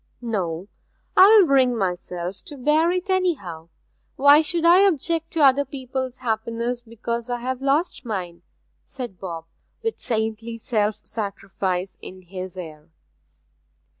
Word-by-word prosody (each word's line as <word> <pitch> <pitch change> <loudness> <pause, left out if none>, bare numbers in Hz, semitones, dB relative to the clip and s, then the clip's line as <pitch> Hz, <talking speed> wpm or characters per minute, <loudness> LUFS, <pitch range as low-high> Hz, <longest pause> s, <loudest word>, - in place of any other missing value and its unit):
'No 190 -7 -3 0.5
I'll 405 +1 +8
bring 260 -5 +3
myself 180 -1 -3
to 290 - -8
bear 300 +5 +3
it, 365 +2 -1
anyhow! 200 - -1 0.5
Why 285 +2 +7
should 335 +1 -1
I 345 +2 +7
object 330 -3 +2
to 325 - 0
other 275 +1 +6
people's 260 -1 -5
happiness 230 +2 -1
because 235 +1 -5
I 245 0 -2
have 260 +1 -3
lost 280 +4 0
my 195 -7 -3
own?' 170 0 -21 0.4
said 245 -9 -8
Bob, 165 -4 -6 0.4
with 450 0 -2
saintly 225 0 -2
self 215 -2 -1
sacrifice 195 -3 -3
in 185 0 -10
his 185 0 -7
air. 155 -3 -9
235 Hz, 135 wpm, -23 LUFS, 190-285 Hz, 0.5 s, I'll